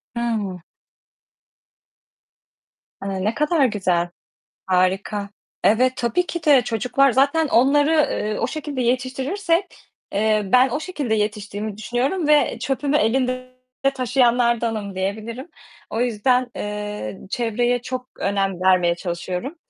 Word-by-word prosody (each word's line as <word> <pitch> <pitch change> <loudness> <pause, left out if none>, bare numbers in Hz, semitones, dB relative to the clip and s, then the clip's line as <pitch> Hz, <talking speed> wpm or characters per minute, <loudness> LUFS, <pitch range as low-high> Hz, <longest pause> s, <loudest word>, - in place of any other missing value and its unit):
Hı. 215 -6 -2 2.4
Hı, 195 - -4
ne 215 +3 +1
kadar 300 +1 +2
güzel. 185 -6 0 0.6
Harika. 190 +2 0 0.3
Evet, 255 +4 +4
tabii 245 +10 0
ki 340 -2 -5
de 280 -4 +6
çocuklar 250 +4 +2
zaten 280 +5 +3
onları, 285 +5 +4 0.2
eee, 210 0 -2
o - - 0
şekilde 285 -2 -4
yetiştirirsek, 265 +10 0 0.5
eee, 215 +1 +2
ben 255 +1 +6
o 295 - -2
şekilde 300 -9 -2
yetiştiğimi 210 0 -3
düşünüyorum 260 +10 -1
ve 290 -6 +3
çöpümü 275 +4 0
elinde 255 +2 0 0.4
taşıyanlardanım 235 -5 +1
diyebilirim. 220 - -4 0.4
O 225 - -2
yüzden, 245 +2 +1
eee, 210 - -5
çevreye 240 +2 0
çok 255 +1 -5
önem 195 -2 -1
vermeye 180 -2 +4
çalışıyorum. 180 - -4
235 Hz, 110 wpm, -22 LUFS, 210-265 Hz, 2.4 s, de